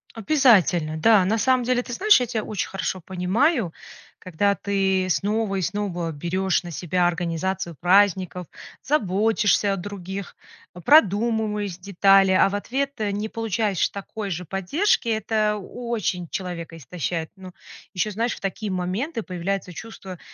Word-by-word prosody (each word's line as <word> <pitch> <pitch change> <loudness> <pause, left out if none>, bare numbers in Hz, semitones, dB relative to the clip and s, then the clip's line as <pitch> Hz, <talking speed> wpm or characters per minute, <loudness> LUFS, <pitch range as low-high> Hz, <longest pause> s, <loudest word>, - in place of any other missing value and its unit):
Обязательно! 200 - +3
Да, 200 +3 +5
на 220 +4 +1
самом 255 +2 +2
деле, 250 0 +1
ты 245 - -9
знаешь, 415 - +5
я 250 - 0
тя 220 -2 -2
очень 205 -3 -3
хорошо 190 -1 -3
понимаю, 190 - 0 0.5
когда 200 +3 0
ты 195 -2 0
снова 205 +2 0
и 190 - -1
снова 175 -3 -2
берешь 185 +5 -1
на 175 - -8
себя 175 +2 0
организацию 175 0 -2
праздников, 185 -1 +2 0.4
заботишься 210 -5 +2
о - - -1
других, 195 0 -7 0.4
а, 180 - -10
продумываешь 210 - +3
детали, 195 0 +4
а 185 - +5
в 200 - -5
ответ, 270 +7 -2
э, 210 -2 -1
не 210 +2 -3
получаешь 220 -3 -1
такой 200 +1 -6
же 180 0 -4
поддержки, 215 - 0
это 215 -1 +1
о 235 +4 -8
очень 180 -6 -1
человека 170 -3 -5
истощает. 165 +1 -4
Ну 185 -1 -11 0.4
еще, 210 +4 0
знаешь, 230 +4 -1
в - - -13
такие 195 +1 -3
моменты 205 - -2
появляется 185 0 -4
чувство 190 -2 -9
195 Hz, 150 wpm, -23 LUFS, 180-220 Hz, 0.5 s, Да